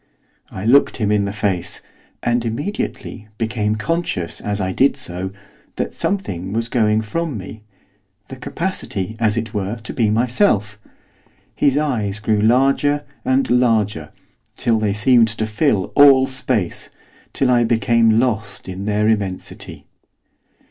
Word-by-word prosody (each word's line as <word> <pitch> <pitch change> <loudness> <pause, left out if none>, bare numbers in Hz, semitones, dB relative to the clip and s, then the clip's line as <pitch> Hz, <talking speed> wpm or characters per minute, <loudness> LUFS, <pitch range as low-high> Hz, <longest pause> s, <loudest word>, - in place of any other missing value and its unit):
I 95 +2 -7
looked 135 +5 +4
him 105 -3 0
in 105 -1 +2
the 100 - -3
face, 100 -4 -2 0.4
and 120 0 +1
immediately 115 - -4
became 110 -2 -1
conscious, 110 - -2
as 105 0 -2
I 95 -1 -1
did 135 +8 +2
so, 95 -7 -3 0.5
that - - -3
something 95 - -3
was 115 +1 -1
going 110 -2 +2
from 155 +4 -3
me, 105 +3 -9 0.7
the 135 - -8
capacity, 130 - -3
as 110 -1 +1
it 115 0 -3
were, 100 +1 -2
to - - -6
be 115 -5 +1
myself. 110 - +1 0.8
His 140 0 +2
eyes 115 -10 -1
grew 105 0 +1
larger 135 +5 +2 0.2
and 130 +1 +1
larger, 110 -9 +1 0.5
till 115 -3 +1
they 105 -2 0
seemed 115 +2 +4
to 110 0 -2
fill 110 -2 0
all 140 -2 +7
space 125 -8 -2 0.4
till 130 -2 +1
I 120 -1 +4
became 115 -1 +3
lost 115 -6 -2
in 95 +1 -6
their 105 0 +1
immensity. 100 -4 -3
110 Hz, 140 wpm, -19 LUFS, 105-130 Hz, 0.8 s, all